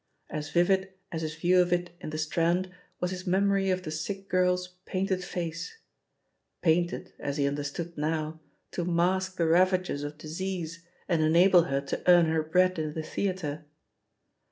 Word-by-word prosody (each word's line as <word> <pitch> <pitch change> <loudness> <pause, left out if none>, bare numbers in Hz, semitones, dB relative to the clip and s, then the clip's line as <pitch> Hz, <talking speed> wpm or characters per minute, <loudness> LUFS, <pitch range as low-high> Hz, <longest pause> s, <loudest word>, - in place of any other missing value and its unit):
As 150 -1 -4
vivid 190 +2 +2 0.2
as 165 -2 -3
his 155 -1 -3
view 180 +3 +4
of 175 0 0
it 175 0 0
in - - -5
the 155 - -4
Strand 170 +4 +1 0.3
was 180 0 -1
his 185 0 -6
memory 195 +1 +2
of 185 0 0
the 155 - -5
sick 195 +5 -4
girl's 180 0 +2 0.2
painted 185 -1 -1
face 170 - -5 0.4
— - - -50
^painted, 170 +1 +1
as 140 +1 -3
he 140 - +2
understood 145 +4 -4
now, 155 +1 -2 0.3
to 175 - -2
mask 180 +2 +1
the 170 - +2
ravages 180 -2 +3
of 145 +1 -6
disease 165 +1 -5 0.2
and 170 -3 +2
enable 170 +3 +6
her 135 0 0
to 140 - -4
earn 175 -1 +8
her 160 0 +1
bread 180 +3 +2
in 155 -1 -3
the 160 - -3
theatre. 155 -4 -3
175 Hz, 170 wpm, -28 LUFS, 155-185 Hz, 0.4 s, earn